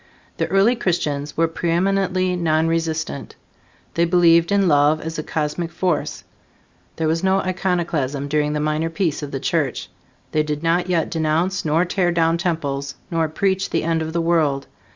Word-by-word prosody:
The - - 0
early 200 +6 +3
Christians 150 -9 -2
were 165 +1 +3
preeminently 185 +2 0
nonresistant. 160 -3 -1 0.6
They 170 - +2
believed 170 0 +4
in 200 -1 +3
love 145 0 +4
as 160 0 -5
a - - 0
cosmic 155 +2 -3
force. 180 -4 -2 0.7
There 160 - -1
was 165 +2 0
no 190 0 +3
iconoclasm 170 -7 -1
during 150 0 0
the 150 - -1
minor 155 +2 0
peace 165 -2 -1
of 145 - -5
the 135 - -4
Church. 145 -4 -1 0.4
They 155 - +2
did 150 0 -3
not 175 +2 +1
yet 170 -3 0
denounce 165 +4 0
nor 160 +3 +2
tear 180 -1 +1
down 165 0 +2
temples, 140 -6 -2 0.2
nor 165 -2 +1
preach 190 +4 0
the - - 0
end 165 0 0
of 160 0 -3
the 170 +1 0
world. 155 -5 +1
165 Hz, 165 wpm, -21 LUFS, 155-175 Hz, 0.7 s, believed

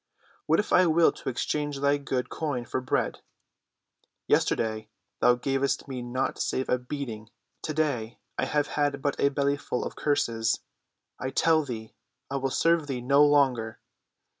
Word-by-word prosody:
"What 160 - +4
if 210 - -1
I 180 0 +6
will 165 +1 +5
to - - -6
exchange 145 +3 -2
thy 140 +1 +3
good 130 -3 -2
coin 140 -6 -3
for 130 - -2
bread? 130 - -1 1.1
Yesterday 110 -1 +1 0.3
thou 125 - +5
gav'st 135 +2 -1
me 130 -2 -5
naught 120 +2 -2
save 130 - -1
a 125 - +2
beating; 125 -5 -6 0.3
to‐day 145 -8 -1 0.2
I - - 0
have 145 -1 0
had 145 -1 -1
but 145 - +1
a 140 - +4
bellyful 140 -2 -1
of - - -6
curses. 130 -7 0 0.6
I 130 - -2
tell 160 +3 +3
thee 110 -5 -7 0.4
I 140 - 0
will 135 0 -1
serve 165 +2 +2
thee 130 -3 -3
no 140 +4 +5
longer. 130 -6 +2
140 Hz, 155 wpm, -27 LUFS, 125-145 Hz, 1.1 s, I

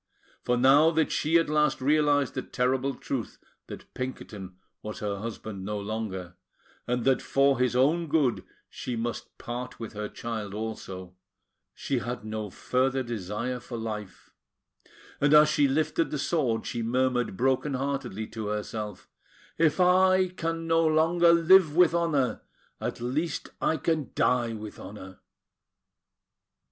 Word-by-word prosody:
For 125 - +1
now 140 +5 +6
that 160 -1 +1
she 160 +3 +2
at 165 - +2
last 150 -1 +2
realised 145 0 +2
the - - -2
terrible 130 +2 -1
truth 125 -3 -4 0.3
that - - -10
Pinkerton 105 -7 -6 0.2
was 105 0 -6
her 100 -1 -3
husband 105 -2 -6
no 105 +1 -3
longer, 100 -4 -4 0.5
and 125 -1 -1
that 135 -1 +3
for 140 -1 +2
his 125 -1 +1
own 155 +7 +3
good 145 -5 +1 0.2
she 125 - -5
must 115 +1 -5
part 125 +1 -6
with 115 -2 -7
her 105 0 -4
child 110 -4 -5
also, 95 -4 -6 0.6
she 135 -3 -1
had 120 -2 -5
no 110 -1 -4
further 130 +6 0
desire 115 +2 -4
for 120 0 -7
life; 105 -4 -6 0.9
and 145 +1 +4
as 150 0 +7
she 150 -2 +3
lifted 155 +4 0
the 150 - -3
sword, 135 -7 0
she 120 - -3
murmured 125 -2 0
broken 135 +2 +1
heartedly 135 -5 -3
to 110 -1 -6
herself: 105 -1 -4 0.5
"If 160 +1 +3
I 185 +1 +4
can 165 -2 -3
no 165 0 +3
longer 165 +2 +4
live 170 -1 +5
with 175 -1 +5
honour, 150 -9 +1 0.4
at - - -4
least 140 +6 -2
I 160 - +2
can 155 -1 -1
die 120 -2 +2
with 105 -1 -8
honour!" 95 -2 -10
125 Hz, 145 wpm, -27 LUFS, 110-150 Hz, 0.9 s, as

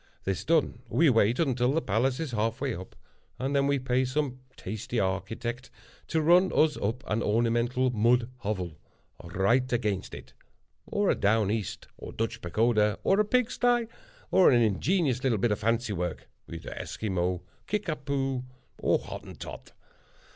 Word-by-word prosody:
This 95 -2 -2
done, 155 -6 +1
we 140 +6 +4
wait 115 +1 +3
until 130 -4 +1
the 160 - +2
palace 125 +6 +1
is 160 -5 -3
half 115 0 -1
way 135 -3 -1
up, 95 -1 -9 0.4
and 135 +2 -2
then 140 0 +3
we 140 0 +2
pay 130 0 +1
some 130 0 -2 0.2
tasty 110 +2 -4
architect 110 +6 -3 0.4
to 160 -1 0
run 180 +4 +5
us 155 -1 +4
up 115 +6 -2
an 110 +2 -1
ornamental 120 +4 +1
mud 120 +1 +3
hovel, 95 - -4 0.4
right 100 +9 +1
against 105 -6 -1
it; - - -12 0.5
or 205 -1 +1
a - - +1
Down 105 0 +2
East 110 -5 -3
or - - -8
Dutch 115 0 -3
Pagoda, 105 +3 +2
or 195 - +3
a - - +5
pig 245 +2 +1
sty, 240 -1 +2 0.5
or 190 - +6
an 120 -2 +5
ingenious 130 - +1
little 125 -5 +2
bit 110 +3 +1
of 105 - 0
fancy 115 0 0
work, 90 -2 -4 0.2
either 80 -1 -7
Esquimau, 90 -4 -2 0.3
Kickapoo, 140 -9 -2 0.4
or - - +3
Hottentot. - - -9
120 Hz, 155 wpm, -28 LUFS, 105-140 Hz, 0.5 s, or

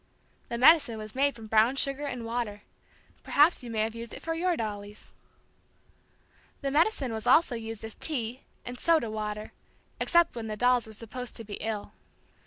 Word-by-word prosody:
The 235 - -2
medicine 265 -3 +6
was 215 0 -7
made 280 +1 +2
from 225 -1 -10
brown 220 +4 +4
sugar 275 +1 -1
and 250 -4 -5
water. 230 -3 -3 0.6
Perhaps 300 +3 +4
you 245 - -8
may 220 -2 -1
have 220 +1 -1
used 230 0 -7
it - - -10
for 325 - -1
your 345 +1 0
dollies. 205 -1 -6 1.5
The 275 -1 -1
medicine 295 - +2
was 220 -1 -4
also 320 -5 +5
used 225 -2 -6
as 220 - -6
"tea" 250 -5 -4 0.2
and 245 +1 -6
"soda 320 -10 +2
water," 215 0 -4 0.5
except 340 -5 +3
when 230 -2 -5
the 215 -1 -4
dolls 245 0 +3
were 220 - -10
supposed 235 +3 -8
to 230 - -7
be 205 -1 -7
ill. 215 -1 -4
235 Hz, 180 wpm, -29 LUFS, 220-275 Hz, 1.5 s, medicine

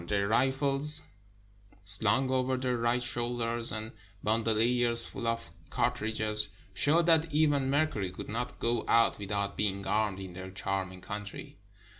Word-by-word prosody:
Their 100 0 -1
rifles, 135 +4 +5 0.8
slung 105 +6 +1
over 130 0 0
their 125 -1 -2
right 120 +1 0
shoul 120 0 -2
ders, 115 0 +1
and 110 +1 -5 0.3
bandoliers 115 +2 +3
full 115 - -6
of 115 0 -3 0.2
cartridges, 110 -1 -1 0.2
showed 155 - +2
that 165 -1 +2
even 145 -3 +1
Mercury 140 -10 -1
could 90 - -9
not 120 +3 -5
go 115 -1 -1
out 115 -2 +2
without 100 0 -3
being 100 -1 -2
armed 105 -2 -1
in 95 -2 -9
their 95 +1 -9
"charming" 95 -1 -4
country. 100 0 -9
115 Hz, 140 wpm, -29 LUFS, 105-130 Hz, 0.8 s, rifles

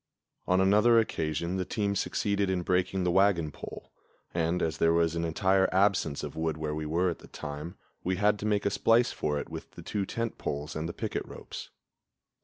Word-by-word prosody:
On 90 +1 +3
another 105 +5 +5
occasion 85 -4 0
the 95 - 0
team 100 +1 -1
succeeded 100 0 0
in 90 -2 0
breaking 90 +1 +1
the 90 - +2
wagon 90 -5 +3
pole; - - -9 0.4
and, 85 +1 +1
as 80 -4 -1
there 80 0 +4
was 85 -1 +2
an 85 - -1
entire 95 +4 +2
absence 95 -6 +2
of - - -5
wood 80 0 -1
where 75 -1 -2
we 75 0 -3
were 85 +3 +1
at - - -7
the - - -14
time, 75 +5 -7 0.3
we 95 +1 0
had 105 +2 +2
to 105 - -2
make 105 -1 +1
a 100 - +2
splice 115 +4 +3
for 75 -1 -1
it 70 - -4
with - - -7
the - - -10
two 100 -2 -2
tent 115 -1 -3
poles 75 +3 -4
and 80 +2 -3
the - - -5
picket - - -3
ropes. - - -8
90 Hz, 210 wpm, -29 LUFS, 80-100 Hz, 0.4 s, another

